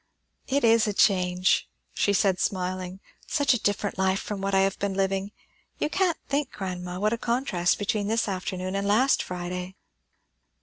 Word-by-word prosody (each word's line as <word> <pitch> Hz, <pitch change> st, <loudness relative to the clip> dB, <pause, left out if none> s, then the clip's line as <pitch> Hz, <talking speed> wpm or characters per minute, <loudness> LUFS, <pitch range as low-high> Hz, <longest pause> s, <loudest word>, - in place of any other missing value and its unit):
"It 280 Hz, 0 st, +1 dB
is 230 Hz, -1 st, +5 dB
a 210 Hz, -, 0 dB
change!" 185 Hz, -2 st, +2 dB, 0.2 s
she 205 Hz, -, +1 dB
said, 190 Hz, -2 st, +2 dB
smiling. 185 Hz, 0 st, -2 dB, 0.3 s
"Such 285 Hz, -3 st, +2 dB
a 240 Hz, -, -1 dB
different 205 Hz, -1 st, -1 dB
life 190 Hz, 0 st, +2 dB
from 205 Hz, -2 st, -5 dB
what 195 Hz, 0 st, 0 dB
I 190 Hz, -, +5 dB
have 195 Hz, 0 st, 0 dB
been 200 Hz, -1 st, -1 dB
living. 195 Hz, +1 st, 0 dB, 0.5 s
You -, -, -1 dB
can't 370 Hz, -4 st, +1 dB
think, 280 Hz, -1 st, 0 dB
grandma, 180 Hz, -2 st, -5 dB
what 215 Hz, +2 st, +1 dB
a 230 Hz, -, -2 dB
contrast 235 Hz, -8 st, 0 dB
between 205 Hz, 0 st, -1 dB
this 225 Hz, +2 st, +1 dB
afternoon 185 Hz, -1 st, -3 dB
and 200 Hz, 0 st, -1 dB
last 245 Hz, +7 st, +3 dB
Friday." 180 Hz, +1 st, -5 dB
195 Hz, 170 wpm, -26 LUFS, 185-215 Hz, 0.5 s, is